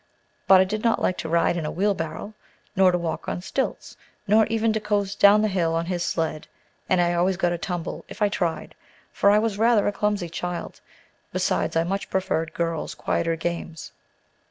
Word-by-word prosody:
But 190 -1 +8
I - - +6
did 210 +3 -4
not 230 -1 +2
like 185 - 0
to 160 - -4
ride 170 +1 +2
in 165 - -2
a - - -2
wheelbarrow, 195 +1 -2 0.4
nor 190 -1 +5
to 175 - +1
walk 170 -2 -4
on - - -3
stilts, 260 +8 -3 0.3
nor 215 +2 +4
even 225 0 +1
to 220 - 0
coast 205 -1 -1
down 205 +1 +6
the - - +3
hill 170 -5 0
on 165 +1 -1
his 175 -1 -2
sled 160 -3 -2 0.4
and 185 - +3
I 175 0 +2
always 180 +2 +1
got 175 -2 +1
a 175 - -1
tumble, 175 -2 -4
if - - -11
I 210 - +3
tried, 175 -5 -2 0.4
for 200 - +3
I 205 - +5
was 215 -2 0
rather 225 -2 +4
a - - +2
clumsy 205 -3 -1
child; 175 +1 -5 0.5
besides, - - 0
I 165 - +3
much 195 +3 -3
preferred 165 -4 -1
girls' 165 -2 -2
quieter 165 0 -1
games. 165 -1 -5
185 Hz, 200 wpm, -24 LUFS, 170-205 Hz, 0.5 s, But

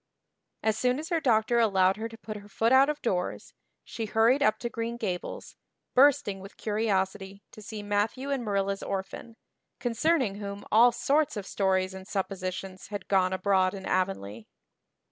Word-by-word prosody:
As 220 0 +1
soon 250 0 +2
as 315 +3 -6
her 335 -2 +1
doctor 235 -2 +3
allowed 195 -4 +3
her 225 +1 -4
to 225 - -11
put 215 -1 -7
her 205 0 -10
foot 225 +3 +1
out 265 +2 +6
of 300 0 -2
doors 180 -6 -2 0.3
she 225 - -5
hurried 230 +6 +3
up 215 -6 +3
to 240 - -4
Green 235 0 -4
Gables, 185 -6 -5 0.4
bursting 255 -7 +4
with 195 +2 -12
curiosity 200 -2 -1
to 215 - -12
see 210 0 -7
Matthew 210 +7 -1
and 270 -3 -1
Marilla's 200 -2 -1
orphan, 195 +4 -5 0.4
concerning 245 -3 +1
whom 200 0 -6
all 235 +3 +7
sorts 275 +2 +1
of 200 - -5
stories 190 -1 0
and 190 0 -9
suppositions 190 -1 -4
had 205 -2 -6
gone 185 -2 +3
abroad 190 0 +2
in 190 -1 -8
Avonlea. 115 - -2
205 Hz, 165 wpm, -28 LUFS, 190-235 Hz, 0.4 s, all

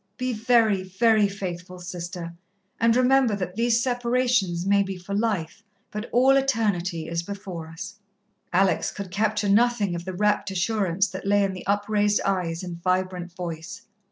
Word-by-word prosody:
Be 255 0 -1
very, 225 -3 +3
very 210 +3 +3
faithful, 180 -2 -6
Sister, 175 -1 -6 0.5
and 230 0 +4
remember 255 -2 +4
that 185 -2 -4
these 235 +1 +2
separations 245 -8 +1
may 200 0 +4
be 195 -1 -3
for 180 +2 -7
life, 205 -6 -1 0.3
but 210 +2 -5
all 260 +3 +5
Eternity 200 -11 0
is 170 0 -2
before 185 -3 -7
us." 180 +6 -8 0.5
Alex 185 -1 +2
could 195 -3 -7
capture 210 +1 0
nothing 210 -2 +3
of 170 0 -4
the 185 - -4
rapt 210 +1 +1
assurance 195 0 0
that 190 +1 -7
lay 205 0 +4
in 195 -1 0
the 185 - -9
upraised 205 +1 +2
eyes 180 -3 -1
and 170 -2 -7
vibrant 185 -1 -1
voice. 175 +2 -6
200 Hz, 155 wpm, -25 LUFS, 180-220 Hz, 0.5 s, all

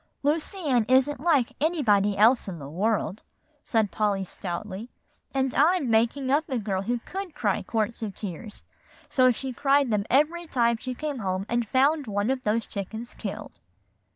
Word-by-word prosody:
"Lucy 310 +7 0
Ann 250 -5 +3
isn't 265 +2 +3
like 290 -6 +2
anybody 210 - +2
else 230 +4 +4
in 185 -3 -5
the 140 -3 -8
world," 205 +5 -1 0.4
said 220 -4 +1
Polly 205 -2 0
stoutly; 190 +4 -6 0.4
"and 265 -1 0
I'm 300 -4 +3
making 240 +4 +2
up 305 +3 +2
a 260 - 0
girl 195 -4 -2
who 240 +5 -1
could 380 -4 -6
cry 210 -9 0
quarts 225 +3 -2
of 210 -3 -4
tears, 210 +2 -7 0.5
so 255 -2 +4
she 260 +2 -4
cried 275 0 +2
them 205 -1 +1
every 320 +6 +2
time 235 -4 +2
she 255 +2 -5
came 295 -1 -4
home 190 -2 -2
and 235 -1 0
found 280 +2 +2
one 205 +3 0
of 265 -1 -1
those 225 0 0
chickens 220 +4 -6
killed." 200 - -7
235 Hz, 170 wpm, -26 LUFS, 205-275 Hz, 0.5 s, else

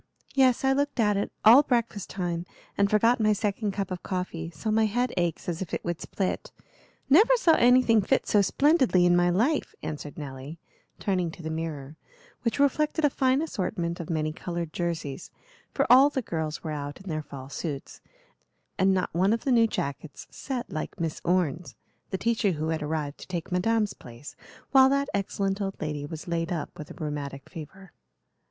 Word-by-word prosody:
"Yes, 260 -2 +3
I 265 0 +4
looked 285 -1 -1
at 210 -2 +3
it 200 - -1
all 235 +6 +10
breakfast 235 -7 -1
time, 175 -2 -3 0.3
and 200 0 +2
forgot 230 +4 +3
my 215 -1 +3
second 205 0 -1
cup 195 -1 -3
of 180 - -4
coffee, 180 -3 -4
so 170 +7 -4
my 220 0 +3
head 245 +4 -1
aches 175 -2 -1
as 175 0 -3
if 185 - -3
it - - -6
would 175 -1 -3
split. 190 -2 -3 0.6
Never 425 - +6
saw 360 -8 +4
anything 245 -4 +5
fit 195 - +1
so 205 - +4
splendidly 260 - +3
in 175 0 +5
my 175 0 +3
life," 240 - +1
answered 150 -1 -6
Nelly, 140 +1 -7 0.4
turning 185 -4 0
to 165 +1 -11
the 160 - -3
mirror, 155 -2 -5 0.4
which 230 - -1
reflected 300 +2 +2
a 290 - +3
fine 260 +3 +2
assortment 175 - -3
of 170 - -6
many 155 -2 -1
colored 170 -1 -5
jerseys; 165 -5 -3 0.4
for - - +1
all 265 +3 +7
the 265 -3 -3
girls 160 -4 -4
were 160 - -4
out 145 -1 -5
in 195 - -13
their 155 -3 -2
fall 135 -3 -9
suits, 140 0 -6 0.8
and 190 0 +4
not 185 - -1
one 190 +5 +3
of 230 - -2
the 270 - 0
new 230 -2 +5
jackets 140 -5 -5
set 260 -4 -5
like 155 - -5
Miss 165 -2 -3
Orne's, 170 -6 0 0.3
the 190 - -2
teacher 220 -3 +1
who 155 0 -3
had 160 -1 -1
arrived 150 -1 -3
to - - -10
take 175 -2 -5
Madame's 210 +3 +1
place 120 +4 -12 0.4
while 265 -1 +7
that 280 +1 +1
excellent 195 0 -1
old 195 -1 -3
lady 150 -2 -4
was 160 +2 -8
laid 170 0 -2
up 165 -4 -4
with 150 - -8
a - - -10
rheumatic 145 -3 -5
fever. 185 +4 -10
185 Hz, 190 wpm, -27 LUFS, 160-230 Hz, 0.8 s, all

